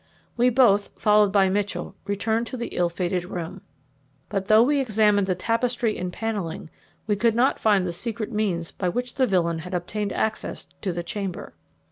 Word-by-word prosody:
We 245 +1 +4
both, 225 -5 +4
followed 210 -1 +4
by 195 -1 +4
Mitchell, 205 +1 -2
returned 220 +3 0
to 255 - -5
the 235 - -4
ill 175 -1 0
fated 180 +1 -2
room; 175 -2 -6 0.7
but, 195 -2 -2
though 215 +1 +7
we 285 +3 +2
examined 210 -5 +3
the 185 - +1
tapestry 230 +3 0
and 180 0 -4
panelling, 190 -7 -4 0.3
we 210 - +1
could 230 +2 +2
not 250 +3 +2
find 205 -4 +3
the 175 - -2
secret 225 +4 -4
means 190 -7 -1
by 185 - -2
which 245 +6 -3
the 260 -2 +2
villain 170 -4 +1
had 180 +3 -5
obtained 200 +3 -2
access 220 +2 -2 0.2
to 195 - -1
the 175 0 -4
chamber. 195 +1 -5
205 Hz, 180 wpm, -24 LUFS, 180-225 Hz, 0.7 s, though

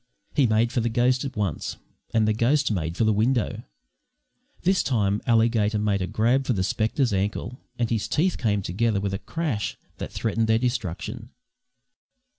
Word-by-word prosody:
He 140 -5 +4
made 110 +2 +2
for 125 - 0
the 115 - 0
ghost 125 +3 +2
at 135 - -5
once, 100 -7 -2 0.3
and 110 -2 +2
the 110 - +3
ghost 130 +5 +2
made 85 -3 -2
for - - +2
the 110 0 +3
window. 115 +3 +1 1.0
This 190 +1 +3
time 105 -5 +1
Alligator 115 -2 +3
made 105 -2 0
a 90 - -1
grab 125 +7 +1
for 125 - +2
the 95 -4 0
spectre's 110 +5 0
ankle, 105 +5 -2 0.2
and 120 - +1
his 110 -2 -1
teeth 175 +4 +1
came 105 -4 +1
together 105 +4 0
with 100 0 -2
a 95 - -2
crash 150 -11 -3 0.2
that - - -5
threatened 115 0 0
their 110 0 +4
destruction. 115 -8 -3
110 Hz, 175 wpm, -25 LUFS, 105-125 Hz, 1.0 s, He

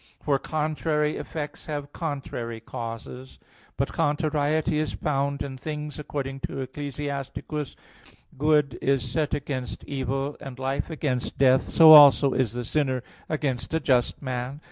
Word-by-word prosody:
For 140 -2 +2
contrary 155 0 -1
effects 150 -2 -6
have 145 -2 -5
contrary 135 -7 -4
causes. 115 +3 -7 0.4
But - - -1
contrariety 155 0 +1
is 155 - -1
found 140 -1 -1
in 135 -2 -6
things, 150 +2 -5
according 135 -2 -4
to - - -4
Ecclus. 140 +1 -6
33:15: 145 0 -4 0.6
"Good 150 -4 +2
is 135 -1 +1
set 150 -2 0
against 135 -3 -5
evil, 135 +1 -3
and 135 -3 -8
life 135 +3 -2
against 145 -6 -2
death; 130 -1 +4
so 160 -1 +8
also 145 -2 +9
is 125 -5 0
the 125 0 -3
sinner 130 -2 0 0.3
against 145 -2 -2
a - - +2
just 130 -5 +1
man." 130 +1 -4
140 Hz, 140 wpm, -26 LUFS, 130-150 Hz, 0.6 s, also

